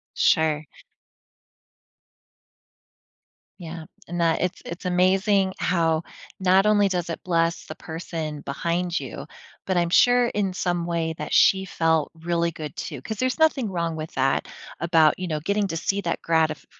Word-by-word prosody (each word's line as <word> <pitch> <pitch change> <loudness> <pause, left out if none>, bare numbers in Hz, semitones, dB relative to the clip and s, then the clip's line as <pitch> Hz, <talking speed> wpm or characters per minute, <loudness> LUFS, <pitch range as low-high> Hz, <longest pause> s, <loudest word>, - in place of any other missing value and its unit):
Sure. 155 -1 +2 2.9
Yeah, 165 -2 -8 0.2
and 175 +1 -4
that 165 -1 +2
it's 180 -1 -2
it's 170 +2 -8
amazing 190 +2 +2
how 165 -3 +1 0.4
not 190 +1 +4
only 205 -1 +4
does 175 -2 -2
it 165 - -4
bless 170 -1 0
the 155 - -7
person 160 -2 -6
behind 170 +5 -2
you, - - -7 0.4
but 185 -2 +1
I'm 170 -1 +2
sure 245 +6 +5
in 200 -4 -1
some 175 -2 -1
way 165 -1 -1
that 150 - -5
she 190 0 +4
felt 160 -3 +1
really 170 +1 -1
good 155 -2 -7
too 145 -6 -6
'cause 220 - -5
there's 255 0 0
nothing 290 -8 +2
wrong 170 -3 -2
with 155 0 -6
that 135 0 +1 0.3
about, 160 -2 +4
you 185 - -3
know, 155 -2 -2
getting 200 +4 0
to 165 - -3
see 195 +4 -1
that 170 -3 -2
gratif 160 -2 +1
170 Hz, 155 wpm, -24 LUFS, 160-190 Hz, 2.9 s, sure